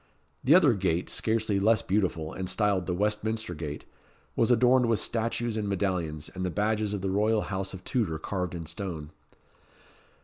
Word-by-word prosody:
The 145 Hz, +6 st, +6 dB
other 150 Hz, -9 st, +6 dB
gate, 90 Hz, -4 st, -1 dB
scarcely 110 Hz, -3 st, 0 dB
less 110 Hz, +2 st, +3 dB
beautiful, 90 Hz, -5 st, 0 dB
and 95 Hz, -1 st, -4 dB
styled 100 Hz, -4 st, +1 dB
the 90 Hz, -, 0 dB
Westminster 105 Hz, 0 st, -1 dB
Gate, 75 Hz, -2 st, -6 dB, 0.5 s
was 115 Hz, -, +2 dB
adorned 125 Hz, +1 st, +5 dB
with 115 Hz, -1 st, +3 dB
statues 115 Hz, 0 st, -1 dB
and 105 Hz, -2 st, -2 dB
medallions, 90 Hz, -6 st, -1 dB
and 95 Hz, -, -6 dB
the 90 Hz, -, 0 dB
badges 105 Hz, +2 st, 0 dB
of 100 Hz, -, -4 dB
the 95 Hz, 0 st, -1 dB
royal 105 Hz, +2 st, +2 dB
house 95 Hz, 0 st, -3 dB
of 95 Hz, -, -11 dB
Tudor 100 Hz, -11 st, -1 dB
carved 90 Hz, +2 st, -3 dB
in 85 Hz, -1 st, -5 dB
stone. 85 Hz, -3 st, -6 dB
100 Hz, 170 wpm, -28 LUFS, 90-110 Hz, 0.5 s, The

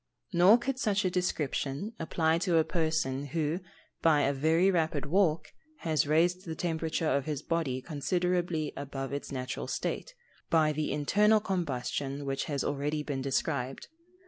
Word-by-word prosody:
Nor 180 Hz, +6 st, +7 dB
could 255 Hz, +2 st, -3 dB
such 205 Hz, -4 st, +1 dB
a 185 Hz, -, +1 dB
description 160 Hz, -, -1 dB
apply 160 Hz, 0 st, +1 dB
to 175 Hz, -2 st, +2 dB
a 160 Hz, -, +5 dB
person 155 Hz, -5 st, -1 dB
who, 155 Hz, +3 st, -1 dB, 0.4 s
by 155 Hz, -3 st, +4 dB
a 140 Hz, -, +2 dB
very 160 Hz, +7 st, +3 dB
rapid 160 Hz, -5 st, 0 dB
walk, 160 Hz, -2 st, +2 dB, 0.3 s
has 155 Hz, -3 st, +1 dB
raised 175 Hz, +4 st, +2 dB
the 160 Hz, -3 st, -5 dB
temperature 160 Hz, -1 st, -1 dB
of 140 Hz, -1 st, +1 dB
his 150 Hz, -3 st, -3 dB
body 140 Hz, -7 st, -1 dB
considerably 175 Hz, 0 st, -1 dB
above 135 Hz, -1 st, -5 dB
its 140 Hz, -, -4 dB
natural 130 Hz, -2 st, -4 dB
state, -, -, -3 dB, 0.3 s
by 160 Hz, -2 st, +4 dB
the 150 Hz, 0 st, -2 dB
internal 205 Hz, +10 st, +3 dB
combustion 145 Hz, -, -2 dB
which 135 Hz, 0 st, -2 dB
has 140 Hz, -3 st, -2 dB
already 150 Hz, +2 st, -1 dB
been 140 Hz, -3 st, -3 dB
described. 135 Hz, -1 st, -2 dB
155 Hz, 150 wpm, -30 LUFS, 140-175 Hz, 0.4 s, Nor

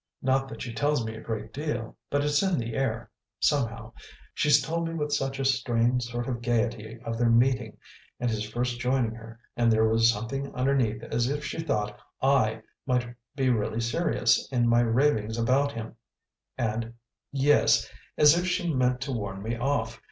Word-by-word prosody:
Not 135 Hz, +1 st, +2 dB
that -, -, -7 dB
she 120 Hz, -3 st, -6 dB
tells 145 Hz, +2 st, +1 dB
me 110 Hz, -, -4 dB
a 110 Hz, -, -9 dB
great 110 Hz, -1 st, -5 dB
deal, 130 Hz, -6 st, -4 dB
but 145 Hz, 0 st, +1 dB
it's 150 Hz, 0 st, +2 dB
in 190 Hz, -3 st, +1 dB
the 115 Hz, -2 st, -3 dB
air, 115 Hz, -2 st, -2 dB, 0.3 s
somehow; 115 Hz, -6 st, 0 dB, 0.4 s
she 150 Hz, -, 0 dB
told 160 Hz, +4 st, +2 dB
me 165 Hz, -, -4 dB
with 150 Hz, -2 st, -2 dB
such 135 Hz, -1 st, -1 dB
a 135 Hz, -, -2 dB
strained 125 Hz, -2 st, +2 dB
sort 120 Hz, 0 st, -4 dB
of 120 Hz, -3 st, -3 dB
gaiety 115 Hz, -1 st, -1 dB
of 115 Hz, 0 st, -3 dB
their 120 Hz, -1 st, +3 dB
meeting 120 Hz, -1 st, +2 dB, 0.4 s
and 125 Hz, -, -1 dB
his 110 Hz, -1 st, -2 dB
first 120 Hz, +2 st, -2 dB
joining 125 Hz, -2 st, +1 dB
her; 115 Hz, 0 st, -11 dB, 0.2 s
and 120 Hz, -1 st, +3 dB
there 110 Hz, 0 st, +4 dB
was 115 Hz, +1 st, +4 dB
something 115 Hz, +6 st, -4 dB
underneath 125 Hz, -4 st, +1 dB
as 120 Hz, +1 st, -1 dB
if 145 Hz, +1 st, -3 dB
she 150 Hz, -, -4 dB
thought 105 Hz, -9 st, -2 dB, 0.2 s
I 120 Hz, -5 st, +2 dB, 0.2 s
might 125 Hz, -2 st, 0 dB, 0.2 s
be 135 Hz, -3 st, +2 dB
really 110 Hz, -1 st, -1 dB
serious 120 Hz, -1 st, +1 dB
in 120 Hz, -2 st, +2 dB
my 120 Hz, 0 st, +4 dB
ravings 115 Hz, -2 st, +1 dB
about 135 Hz, +5 st, +2 dB
him, 115 Hz, 0 st, -7 dB, 0.6 s
and 115 Hz, -1 st, -2 dB, 0.4 s
yes, 140 Hz, +1 st, +3 dB, 0.3 s
as 150 Hz, +1 st, +7 dB
if 175 Hz, +1 st, 0 dB
she 175 Hz, -2 st, 0 dB
meant 125 Hz, -1 st, +1 dB
to 140 Hz, +1 st, -3 dB
warn 100 Hz, -5 st, -4 dB
me 115 Hz, +2 st, -2 dB
off. 120 Hz, -3 st, -1 dB
120 Hz, 180 wpm, -27 LUFS, 115-135 Hz, 0.6 s, as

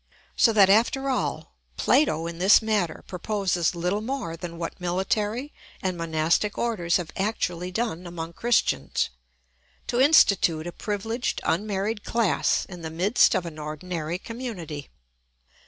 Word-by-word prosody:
So 230 Hz, -, +5 dB
that, 200 Hz, -3 st, +6 dB
after 245 Hz, +7 st, +3 dB
all, 255 Hz, -, -2 dB, 0.2 s
Plato 165 Hz, -, +2 dB
in 170 Hz, 0 st, -6 dB
this 190 Hz, +3 st, +7 dB
matter 215 Hz, -6 st, -1 dB
proposes 180 Hz, -2 st, -1 dB
little 180 Hz, +5 st, -1 dB
more 235 Hz, -8 st, -3 dB
than 170 Hz, 0 st, -7 dB
what 170 Hz, +2 st, -6 dB
military 205 Hz, +9 st, -1 dB, 0.3 s
and 185 Hz, -1 st, -2 dB
monastic 165 Hz, +4 st, 0 dB
orders 185 Hz, -8 st, +1 dB
have 175 Hz, -3 st, -6 dB
actually 185 Hz, -3 st, -2 dB
done 185 Hz, -4 st, -2 dB
among 170 Hz, -1 st, -6 dB
Christians: 235 Hz, -, +1 dB, 0.7 s
to 245 Hz, -, 0 dB
institute 195 Hz, -, +5 dB
a 175 Hz, -, -4 dB
privileged 225 Hz, +6 st, -3 dB
unmarried 205 Hz, +3 st, -1 dB
class 230 Hz, -4 st, +1 dB
in 180 Hz, -2 st, -10 dB
the 160 Hz, -, -5 dB
midst 185 Hz, +8 st, +3 dB
of 180 Hz, -, 0 dB
an 160 Hz, -2 st, -7 dB
ordinary 155 Hz, +2 st, -4 dB
community. 185 Hz, -, -7 dB
185 Hz, 135 wpm, -25 LUFS, 170-220 Hz, 0.7 s, this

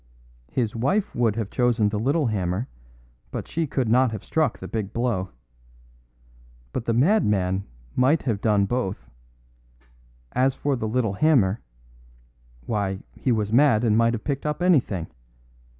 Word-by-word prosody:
His 115 Hz, -4 st, -1 dB
wife 185 Hz, -, 0 dB
would 115 Hz, -3 st, +1 dB
have 110 Hz, -3 st, -3 dB
chosen 120 Hz, -4 st, +2 dB
the 105 Hz, 0 st, -2 dB
little 140 Hz, +7 st, +1 dB
hammer, 100 Hz, 0 st, -1 dB, 0.6 s
but -, -, -5 dB
she 165 Hz, -1 st, -2 dB
could 130 Hz, -3 st, -1 dB
not 125 Hz, +3 st, +4 dB
have 110 Hz, -3 st, -6 dB
struck 155 Hz, -7 st, 0 dB
the -, -, -8 dB
big 105 Hz, -3 st, -4 dB
blow. 115 Hz, -6 st, -1 dB, 1.4 s
But 115 Hz, -, -3 dB
the 115 Hz, -, +1 dB
madman 105 Hz, -, +2 dB, 0.3 s
might 135 Hz, +6 st, +3 dB
have 110 Hz, -6 st, -1 dB
done 105 Hz, -3 st, +3 dB
both. 110 Hz, -4 st, -3 dB, 1.2 s
As 130 Hz, +1 st, +2 dB
for 145 Hz, -1 st, 0 dB
the 110 Hz, -3 st, -3 dB
little 110 Hz, -2 st, 0 dB
hammer 115 Hz, -5 st, +3 dB, 1.0 s
why, 100 Hz, -3 st, -2 dB
he 130 Hz, -, -1 dB
was 110 Hz, -2 st, 0 dB
mad 125 Hz, -4 st, +5 dB
and 110 Hz, -3 st, +3 dB
might 115 Hz, +1 st, +3 dB
have 110 Hz, -, -7 dB
picked 140 Hz, +1 st, -2 dB
up 150 Hz, +4 st, -2 dB
anything. 130 Hz, -, +2 dB
115 Hz, 150 wpm, -24 LUFS, 105-130 Hz, 1.4 s, mad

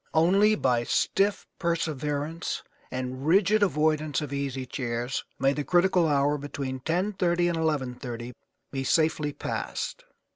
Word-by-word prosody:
Only 195 Hz, +7 st, +5 dB
by 125 Hz, -, +1 dB
stiff 200 Hz, +10 st, +1 dB
perseverance 160 Hz, -2 st, -2 dB, 0.3 s
and 130 Hz, +2 st, -4 dB
rigid 200 Hz, +5 st, +4 dB
avoidance 155 Hz, -4 st, +2 dB
of 145 Hz, -3 st, -5 dB
easy 135 Hz, -2 st, -2 dB
chairs 125 Hz, 0 st, -3 dB
may 135 Hz, +2 st, +3 dB
the 145 Hz, -, -2 dB
critical 175 Hz, +1 st, +3 dB
hour 145 Hz, 0 st, +2 dB
between 140 Hz, -2 st, -4 dB
10:30 175 Hz, +9 st, 0 dB, 0.4 s
and 150 Hz, -7 st, -1 dB
11:30 120 Hz, -1 st, -6 dB, 0.4 s
be 135 Hz, -1 st, -2 dB
safely 155 Hz, +1 st, +2 dB
passed. -, -, -4 dB
150 Hz, 120 wpm, -27 LUFS, 130-165 Hz, 0.4 s, Only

